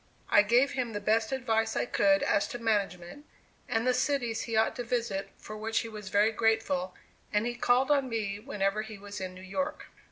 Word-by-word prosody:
I - - +8
gave 240 +7 +3
him 250 -4 -2
the 205 - -2
best 220 +3 +1
advice 225 -4 0
I - - +1
could 195 -4 +3
as 200 - +2
to - - -5
management, 210 - -2 0.4
and 225 +1 0
the 255 - +3
cities 250 -3 0
he 230 - -3
ought 220 0 +2
to 245 - -2
visit, 230 -5 -2
for 215 - -9
which 225 +1 -1
he 230 - -6
was 210 -3 -8
very 205 +3 +3
grateful 220 -5 0 0.4
and 210 +1 +1
he 240 - -1
called 245 +3 +2
on 275 -3 +2
me 205 -3 -2
whenever 210 -4 -1
he 220 -1 -8
was 205 0 -8
in 185 -1 -5
New 185 - -11
York. 280 +11 -4
220 Hz, 210 wpm, -29 LUFS, 205-240 Hz, 0.4 s, I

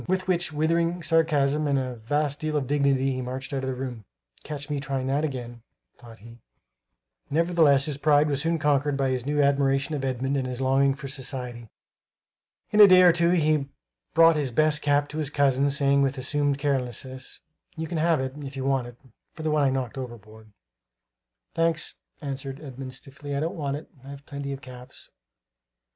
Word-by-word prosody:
With 185 0 -1
which 175 -2 0
withering 165 +3 0
sarcasm 155 -3 +2
and 140 -1 +2
a 130 -2 -3
vast 145 +5 -1
deal 155 -1 -1
of 140 - -1
dignity 135 -1 +1
he 130 - -3
marched 130 +2 -5
out 135 -1 -2
of 130 - -2
the 130 - -3
room. 125 -3 -6 0.4
"Catch 145 -1 -6
me 145 -1 -2
trying 135 -2 -3
that 140 +3 0
again," 120 -5 -5 0.4
thought 115 -2 -13
he. 115 +2 -14 0.9
Nevertheless 160 -3 +3
his 145 -3 -4
pride 150 0 +4
was 140 -2 -1
soon 165 +2 0
conquered 145 -1 +1
by 135 -1 +1
his 130 0 -3
new 145 0 +2
admiration 140 +1 +1
of 145 -2 -3
Edmund 135 +1 -1
and 130 -1 -1
his 125 -1 -5
longing 135 +1 +2
for 140 -1 -8
society. 125 -4 -5 1.0
In 210 - +2
a 205 - +11
day 185 -1 +7
or 175 -2 +7
two 170 0 +2
he 155 -5 +2 0.5
brought 165 -1 +6
his 145 -3 0
best 150 +4 +1
cap 145 0 +2
to 155 - -5
his 150 -3 -2
cousin, 140 -1 +2
saying 140 0 +3
with 135 0 0
assumed 145 +2 0
carelessness: 130 -2 -3 0.4
"You 160 - -3
can 160 0 -3
have 165 -1 +2
it, 130 0 -3
if 140 -2 -8
you 135 - -3
want 135 -3 +1
it, 120 -1 -12 0.4
for 160 - -8
the 155 - 0
one 150 -1 +2
I 140 - +3
knocked 130 -1 -3
overboard." 110 -3 -10 1.0
"Thanks," 165 -1 0 0.3
answered 135 -1 -5
Edmund 130 -3 -8
stiffly; 140 +1 -7
"I - - 0
don't 165 +5 -2
want 145 -4 -2
it; 155 - -11 0.2
I've 140 +1 -10
plenty 140 -1 -5
of 135 0 -6
caps." 125 -1 -12
140 Hz, 190 wpm, -26 LUFS, 130-150 Hz, 1.0 s, a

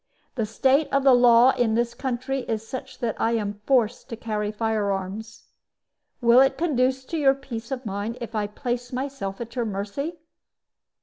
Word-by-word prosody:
The 225 -5 -2
state 265 +7 +2
of 275 0 +2
the 270 -1 +7
law 245 +1 +7
in 225 -4 +1
this 235 0 0
country 260 +2 -2
is 225 -1 -3
such 260 +1 -7
that 230 -3 -1
I 230 - +2
am 205 -2 -2
forced 245 -3 +1
to 230 - -4
carry 215 -2 -3
fire 215 -1 -1
arms. 195 +4 -6 0.7
Will 235 +1 +6
it 270 0 +3
conduce 260 -5 +1
to 330 - -3
your 275 -2 +4
peace 235 -4 -7
of 260 -2 -4
mind 205 +3 -3
if 235 -1 -7
I 210 -2 -1
place 245 +3 -4
myself 255 -7 -4
at 235 0 -7
your 240 -2 0
mercy?" 215 - -4
235 Hz, 180 wpm, -25 LUFS, 220-265 Hz, 0.7 s, the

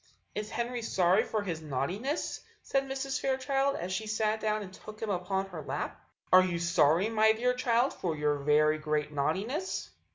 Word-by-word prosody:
"Is 210 0 -4
Henry 240 +1 -2
sorry 185 -4 +3
for 215 -2 -2
his 170 -5 -4
naughtiness?" 180 - -2 0.2
said 270 0 0
Mrs. 270 0 -2
Fairchild, 270 +1 +1
as 180 +2 -3
she 215 +3 -2
sat 215 0 0
down 215 -1 0
and 185 -1 -10
took 215 +3 -11
him 220 -2 -2
upon 190 +1 -1
her 170 -4 -6
lap. 135 -2 -4 0.3
"Are 185 0 +9
you 180 -2 -1
sorry, 170 +2 +3
my 220 -1 +4
dear 250 +3 +1
child, 250 +1 +2
for 170 -4 -2
your 150 -1 0
very 150 +2 +3
great 150 -1 -1
naughtiness?" 195 - -2
205 Hz, 175 wpm, -30 LUFS, 160-235 Hz, 0.3 s, Are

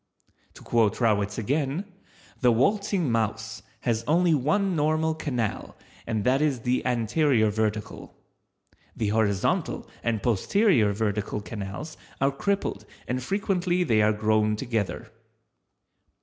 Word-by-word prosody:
To - - -13
quote 115 -3 +1
Rawitz 105 -3 +1
again: 140 - -1 0.6
_The 125 -2 +5
waltzing 190 - +1
mouse 110 0 -2 0.2
has 115 -1 0
only 170 +2 +3
one 180 +7 +1
normal 155 +1 +1
canal 125 -9 -3 0.3
and 110 -3 -1
that 130 +5 +2
is 140 -6 +1
the 125 0 0
anterior 120 -1 +2
vertical. 105 0 -3 0.8
The 110 - -1
horizontal 105 -3 0
and 115 -3 -1
posterior 120 - +3
vertical 105 0 -2
canals 105 +9 -7 0.2
are 135 +1 +2
crippled 200 +8 -2 0.2
and 125 +1 -2
frequently 180 +2 0
they 115 -9 +3
are 105 0 +4
grown 110 0 +1
together. 115 -3 -3
120 Hz, 120 wpm, -26 LUFS, 110-155 Hz, 0.8 s, The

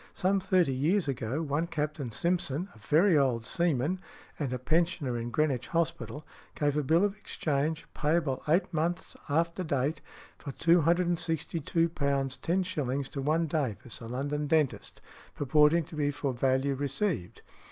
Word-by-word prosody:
Some 195 +2 +1
thirty 180 -6 +2
years 160 +7 +1
ago, 130 +3 -2
one 150 +3 -1
Captain 150 -4 -3
Simpson, 170 - -1
a 110 - -17
very 165 - +4
old 125 -6 +2
seaman 170 - +1 0.4
and 140 -5 -2
a 125 - -1
pensioner 155 -1 0
in 120 0 -3
Greenwich 140 -2 0
Hospital, 155 -5 -2 0.3
gave 145 -1 +1
a 150 - +2
bill 160 +6 +3
of 205 -1 -2
exchange, 155 -5 -2
payable 150 -3 0
eight 175 +4 +2
months 170 +2 -1
after 170 +4 +1
date, 145 0 -1 0.4
for 140 - -7
£262 165 -1 +1
10s. 140 0 -1
to 140 - -4
one 155 +4 +1
Davis, 135 -8 -3
a 115 - -7
London 145 +4 -2
dentist, 150 -3 0 0.3
purporting 150 +4 +4
to 155 - -11
be 145 -1 +1
for 145 -2 -2
value 130 +2 +1
received. 140 - -2
150 Hz, 140 wpm, -29 LUFS, 135-170 Hz, 0.4 s, very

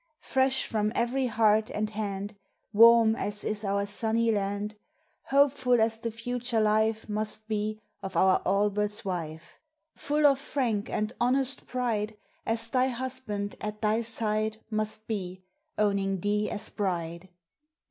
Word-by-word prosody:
Fresh 265 0 +2
from 215 -1 0
every 255 +2 +1
heart 220 -1 +3
and 215 0 -2
hand; 205 -1 -4 0.4
Warm 230 0 +7
as 205 -1 -3
is 215 0 -2
our 200 0 0
sunny 225 +2 0
land; 205 0 -2 0.5
Hopeful 270 -3 +3
as 225 0 +2
the 230 - -3
future 240 +1 -2
life 220 +1 +2
Must 215 0 -3
be, 215 0 -2 0.2
of 190 -3 -5
our 185 +1 +4
Albert's 205 +2 0
wife; 165 -4 -5 0.3
Full 295 +1 0
of 275 -2 +5
frank 245 -8 -1
and 215 +2 -2
honest 260 +2 +2
pride, 220 -4 -2 0.3
As 230 0 0
thy 255 +2 +2
husband 245 -5 -4
at 210 0 -5
thy 215 +2 +2
side 220 -1 -1
Must 215 0 0
be, 185 -4 -4 0.3
owning 195 -2 +1
thee 210 +1 0
as 215 +1 -2
bride. 175 -2 -3
215 Hz, 135 wpm, -28 LUFS, 205-235 Hz, 0.5 s, Warm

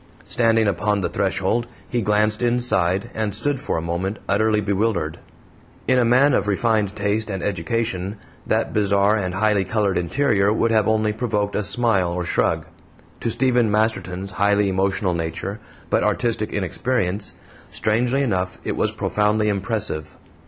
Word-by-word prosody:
Standing 115 -2 +2
upon 100 +2 0
the - - -1
threshold, 100 +4 0 0.2
he 120 - -1
glanced 105 +1 +1
inside, 120 -4 +2
and 110 -3 -2
stood 145 +4 0
for - - -2
a 80 - -3
moment 90 +5 -2
utterly 105 +2 +2
bewildered. 100 -5 -1 0.7
In 130 0 +4
a - - +4
man 130 +4 +4
of 105 - +1
refined 105 0 +1
taste 105 +1 -1
and 95 -2 -4
education 100 +1 -2 0.3
that - - 0
bizarre 100 0 +3
and 95 -4 -2
highly 105 0 +2
colored 100 -3 0
interior 100 - +1
would 115 +1 +1
have 110 -2 +3
only 110 -1 +1
provoked 105 -3 -1
a 105 - 0
smile 105 -5 +2
or 90 0 -3
shrug; - - 0 0.5
to - - -2
Stephen 120 -1 +2
Masterton's 100 -3 -1
highly 100 +1 +2
emotional 95 0 0
nature, 85 +5 -4 0.3
but - - +2
artistic 115 -3 0
inexperience, 100 0 -1 0.3
strangely 120 +5 +1
enough 95 -6 -1
it - - -2
was - - 0
profoundly 105 +1 +1
impressive. 100 -7 -3
105 Hz, 150 wpm, -22 LUFS, 95-115 Hz, 0.7 s, In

